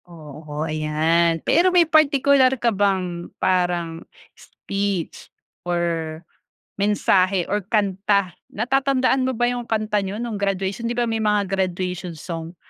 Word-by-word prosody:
Oo, 150 -2 -7
ayan. 160 +2 +1
Pero 345 +4 +4
may 355 -2 +4
partikular 280 -4 +4
ka 235 -1 +1
bang 185 -3 -1
parang 175 -3 0 0.3
speech 200 -3 -4 0.3
or 170 -2 -2 0.6
mensahe 195 -2 +2
or 205 - +1
kanta. 200 -2 +1 0.2
Natatandaan 260 +2 +1
mo 260 - -2
ba 240 +1 +1
yung 245 -1 -5
kanta 215 -1 0
niyo 195 0 -4
no'ng 225 -2 -4
graduation, 195 +3 -2
'di 240 - -2
ba, 240 - +1
may 225 -1 -1
mga 210 -1 +2
graduation 180 -2 -2
song, 165 +1 -7
195 Hz, 130 wpm, -22 LUFS, 170-230 Hz, 0.6 s, Pero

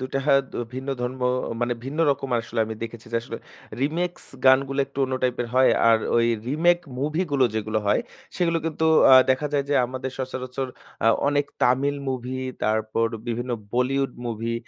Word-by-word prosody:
২ 130 - -4
টা - - +2
হা 145 - +5 0.2
দ - - -16 0.2
ভিন্ন 130 +2 -6
ধর্ম 125 +1 -4 0.4
মানে 120 0 +1
ভিন্ন 140 +4 -5
রকম 135 -1 -2
আসলে 115 0 -3
আমি 110 - -5
দেখেছি 115 0 -7
যে, - - +1
আসলে - - -7 0.4
রিমিক্স 170 +5 -1 0.2
গানগুলো 135 +1 +4
একটু 140 0 -11
অন্য 130 0 -2
টাইপের 125 -1 0
হয়। 130 0 +5 0.2
আর 115 -1 +5 0.2
ওই 115 0 +4 0.2
রিমেক 170 +5 +3 0.2
মুভিগুলো 150 -1 +1
যেগুলো 110 0 -1
হয়, 100 - +3 0.4
সেইগুলো 170 -2 +1
কিন্তু 160 0 -1 0.3
আ - - +11 0.2
দেখা 130 +3 +1
যায় 140 -1 +1
যে, 145 - +1
আমাদের 130 +1 -5
সচরাচর 130 0 -4 0.4
আ - - +4 0.2
অনেক 145 0 +1 0.2
তামিল 135 +3 +2
মুভি, 130 0 -3 0.3
তারপর 110 +1 +1 0.2
বিভিন্ন 120 +2 -3 0.2
বলিউড 135 +2 +1 0.2
মুভি, 115 0 -3
130 Hz, 170 wpm, -24 LUFS, 120-140 Hz, 0.4 s, আ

